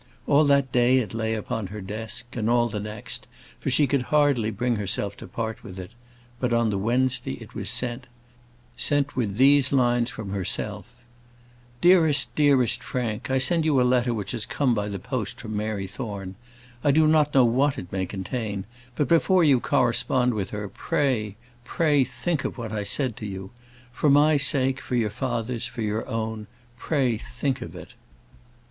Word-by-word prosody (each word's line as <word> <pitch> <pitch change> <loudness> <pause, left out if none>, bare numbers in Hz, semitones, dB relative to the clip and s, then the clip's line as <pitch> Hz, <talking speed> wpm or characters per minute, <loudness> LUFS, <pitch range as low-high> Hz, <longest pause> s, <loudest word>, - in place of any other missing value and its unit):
All 145 +2 +4
that 140 -2 +3
day 125 +1 +4
it 110 -7 -1
lay 110 0 -1
upon 110 -1 -3
her 105 +3 -7
desk, 110 +4 -6
and 115 -2 -1
all 120 0 +3
the 105 -1 -4
next, 105 0 -6 0.3
for - - -2
she 150 - +4
could 140 0 +1
hardly 140 -5 +2
bring 120 +2 -1
herself 100 0 -2
to - - -10
part 110 +4 -5
with 95 -5 -9
it; 95 +1 -8 0.5
but 125 -1 -1
on 115 -2 +2
the 100 - -1
Wednesday 125 +5 0
it - - -11
was - - -3
sent 125 +1 -3 0.7
sent 145 -1 0
with 105 -6 -2
these 140 +1 +5
lines 120 -3 +2
from 110 -5 -7
herself: 100 +3 -1 0.9
"Dearest, 160 -5 +4
dearest 140 -5 +3
Frank, 115 -4 -3
I 130 - +2
send 155 +6 +2
you 150 -4 +3
a - - +4
letter 125 -1 +2
which 105 -4 -3
has 115 -3 -4
come 130 -2 +1
by 105 -2 -2
the 100 - -4
post 110 +1 -4
from 110 -1 -6
Mary 105 -2 -2
Thorne. 100 -2 -6 0.5
I - - +3
do 155 +3 +5
not 155 -2 +3
know 130 -2 +6
what 130 +4 +2
it 90 - -8
may 95 -1 -2
contain; 100 0 -4 0.3
but 145 - 0
before 175 +2 +4
you 140 -5 +5
correspond 125 +1 +1
with 100 -4 -3
her, 105 -1 -5
pray, 105 0 -1 0.3
pray 150 -1 +2
think 165 +3 -2
of - - -4
what 115 -3 -5
I 105 -1 -2
said 125 +2 0
to 105 - -6
you. 95 -1 -7 0.4
For 145 +4 +1
my 145 +2 +5
sake, 135 -1 +2
for 125 - -3
your 110 -4 +1
father's, 120 0 -3
for 115 - -5
your 105 +1 -2
own, 110 -1 -4 0.3
pray 130 -8 0
think 130 +3 -3
of - - -8
it." - - -11
120 Hz, 185 wpm, -25 LUFS, 105-135 Hz, 0.9 s, know